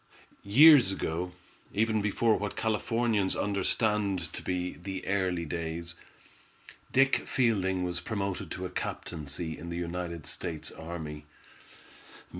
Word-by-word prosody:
Years 130 +1 +8
ago, 90 -1 -2 0.4
even 110 0 +2
before 110 +2 +2
what 105 0 -3
Californians 110 -2 +1
understand 100 -3 +1
to - - -5
be 90 0 -2
the 95 +1 -6
"early 95 -3 0
days," 85 +1 -4 1.0
Dick 135 +1 +5
Fielding 95 -7 +1
was 90 -1 -2
promoted 100 0 -3
to 95 - -4
a 90 - -5
captaincy 80 0 -4
in 85 - -8
the 85 - -4
United 85 -2 -4
States 80 +2 -3
Army. 80 -3 -7
90 Hz, 115 wpm, -29 LUFS, 85-105 Hz, 1.0 s, Years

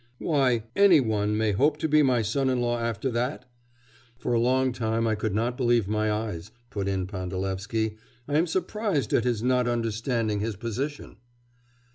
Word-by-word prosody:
Why, 130 -8 +1
any 200 -5 +6
one 105 -4 0
may 110 -1 +1
hope 145 +9 +2
to 160 +1 -1
be 155 0 +4
my 125 -5 +3
son 130 +6 0
in 130 -1 +1
law 120 0 0
after 115 +2 -2
that?' 125 +3 -2 0.7
'For 120 - -2
a 115 - +3
long 130 +2 +2
time 115 -1 -1
I 110 - +2
could 105 -1 -2
not 120 +3 0
believe 120 -5 +2
my 110 +1 0
eyes,' 105 -4 -3 0.2
put 100 -2 -3
in 95 -2 -1
Pandalevsky. 95 +3 -3 0.3
'I 145 - -1
am 165 +4 +3
surprised 185 - -1
at 120 - +3
his 120 -3 0
not 125 -1 +2
understanding 115 -2 -1
his 110 +1 -2
position! 120 +9 -5
115 Hz, 175 wpm, -26 LUFS, 105-130 Hz, 0.7 s, any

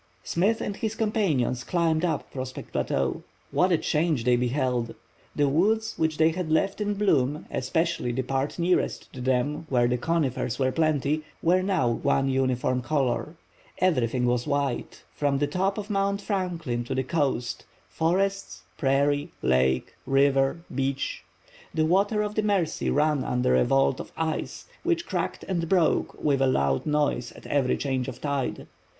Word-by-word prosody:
Smith 205 +7 +1
and 205 0 -3
his 220 -1 -2
companions 190 - 0
climbed 165 -2 +1
up 170 -3 -1
Prospect 130 -1 -6
Plateau. 65 -1 -1 0.3
What 185 +1 +2
a 170 - +4
change 155 -5 0
they 125 +1 +4
beheld! 125 -1 0 0.4
The 145 - +3
woods 220 +10 +2
which 160 -1 0
they 160 0 +4
had 175 -1 -3
left 195 +6 +1
in 205 0 0
bloom, 150 -8 +1
especially 160 0 0
the 130 +2 -1
part 135 +2 -2
nearest 175 +1 0
to 130 - -7
them 130 +5 0
where 120 -2 +3
the 125 0 0
conifers 135 -6 -1
were 130 -1 +1
plenty, 155 0 +1 0.2
were 180 +2 +4
now 185 -8 +1
one 135 +3 +1
uniform 130 -1 +1
color. 130 +1 -1 0.4
Everything 125 -9 +1
was 120 0 0
white, 140 -3 -2
from 145 -2 0
the 145 - +1
top 190 +7 -1
of 210 0 -5
Mount 200 0 +1
Franklin 175 - -2
to - - -3
the 130 - 0
coast—forests, 160 - -2 0.2
prairie, 140 +1 +1
lake, 65 0 +2
river, 135 +2 +3
beach. 135 +1 -2 0.5
The 155 -1 +2
waters 205 +5 +2
of 210 - -4
the 215 - +1
Mercy 195 -6 0
ran 150 -1 +2
under 125 - +1
a 65 - +4
vault 135 -1 +2
of - - -7
ice, 160 -1 -3 0.2
which 340 -1 0
cracked - - -3
and 170 -3 -1
broke 180 -4 +2
with 140 -3 +2
a 135 - +4
loud 70 - +1
noise 145 -5 0
at - - -14
every 135 -3 +1
change 130 -3 -1
of 125 -2 -6
tide. 140 -3 -2
145 Hz, 160 wpm, -26 LUFS, 130-175 Hz, 0.5 s, a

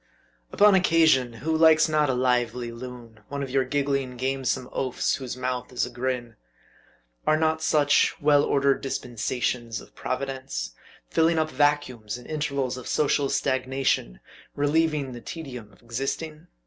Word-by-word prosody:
Upon 210 0 +6
occasion, 160 -9 +4
who 160 0 +1
likes 160 0 +6
not 155 -2 +2
a 130 - +1
lively 125 -1 0
loon, 120 -2 -10
one 140 0 -4
of 135 - -6
your 135 0 +2
giggling, 140 -1 -1
gamesome 130 0 -1
oafs, 130 -2 -1
whose 130 -2 -6
mouth 125 0 -3
is 125 - 0
a - - -8
grin? 120 -2 -3 0.9
Are 155 - +4
not 160 0 +1
such, 145 -2 +3
well 145 -1 +4
ordered 140 -1 +2
dispensations 120 -3 -2
of - - -15
Providence? 130 - -4 0.4
filling 165 0 +3
up 155 0 0
vacuums, 130 -6 0
in 125 - -13
intervals 140 -4 -2
of 125 - -8
social 145 -2 +1
stagnation 130 - 0 0.4
relieving 145 -1 +1
the 120 -1 -8
tedium 125 -10 -8
of 100 - -23
existing 140 +7 -4
135 Hz, 145 wpm, -26 LUFS, 125-150 Hz, 0.9 s, Upon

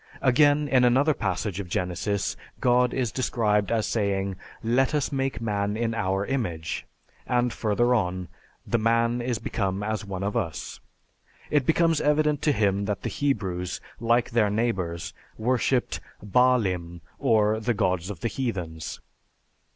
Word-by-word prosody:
Again, 145 +3 +4
in 130 -3 +4
another 135 +5 +4
passage 100 -3 -2
of 95 -3 -5
Genesis, 95 +2 -1 0.2
God 125 0 +3
is 125 -4 -1
described 105 -5 +1
as 115 -2 +1
saying, 100 -3 0 0.3
"Let 130 +5 +2
us 145 - 0
make 135 -5 -1
man 105 -2 -1
in 115 0 0
our 95 -3 0
image 85 -12 -3 0.4
(I, - - -2
26)," - - +5
and 120 -1 0
further 120 +3 +1
on, 90 -5 0 0.4
"The 120 - +1
man 115 +2 +2
is 120 -1 -1
become 100 -2 -2
as 110 0 -2
one 95 -1 -5
of 100 +1 -2
us." 80 -2 -3 0.7
It 145 -4 +2
becomes 165 -1 +3
evident 150 -1 +2
to 150 - +3
him 100 -5 +1
that 105 -1 -3
the - - -1
Hebrews, 95 -10 -1 0.2
like 120 +1 +2
their 110 -3 +3
neighbors, 95 -7 -1 0.2
worshiped 125 +2 +1 0.3
"baalim" 95 -8 +2 0.2
or 110 -5 +3
the 120 +1 0
gods 90 -1 0
of 95 -5 -7
the - - 0
heathens. 90 - -4
110 Hz, 150 wpm, -26 LUFS, 95-125 Hz, 0.7 s, 26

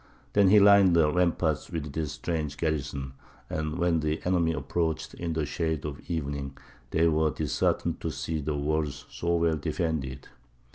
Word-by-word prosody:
Then 100 -2 +5
he 105 +2 +7
lined 100 -3 +7
the 80 -2 +4
ramparts 85 -3 +1
with 75 -3 -4
this 80 -2 -2
strange 75 -4 -3
garrison, 70 -4 -2 0.4
and 75 +1 -2
when 85 -2 +2
the 75 0 -1
enemy 90 -2 +2
approached 80 +2 -2
in 85 -1 -3
the 80 -1 -1
shades 80 -1 -2
of 75 -1 -5
evening, 70 -4 -3 0.3
they 85 +3 +3
were 80 -1 +2
disheartened 75 -1 -1
to - - -2
see 80 -1 -3
the 75 +1 -2
walls 75 -1 -1
so 85 0 -1
well 85 -1 +2
defended. 70 -4 -3
80 Hz, 160 wpm, -28 LUFS, 75-85 Hz, 0.4 s, he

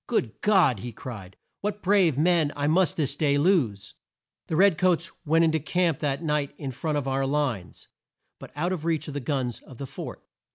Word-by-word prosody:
"Good 125 - -1
God!" 185 - +4
he 120 +4 -6
cried, 105 -5 -9 0.2
"what 210 0 -4
brave 185 -7 +3
men 165 -1 +3
I 145 - -2
must 170 +5 +2
this 145 -3 0
day 145 -1 +2
lose!" 140 - +1 0.5
The 160 - -2
red 190 -1 +4
coats 180 -3 +2 0.2
went 165 +2 +4
in 160 - +3
to 160 - +1
camp 170 0 0
that 145 +2 -1
night 150 -3 -1
in 140 -3 -5
front 150 +4 -2
of 140 -2 -2
our 135 0 0
lines, 135 -10 -2 0.5
but - - -10
out 175 +5 -1
of 165 -4 -5
reach 165 -2 -1
of 150 - -6
the 145 - -2
guns 130 -3 -2
of 130 - -15
the 140 - -5
fort. - - -8
150 Hz, 205 wpm, -26 LUFS, 135-170 Hz, 0.5 s, God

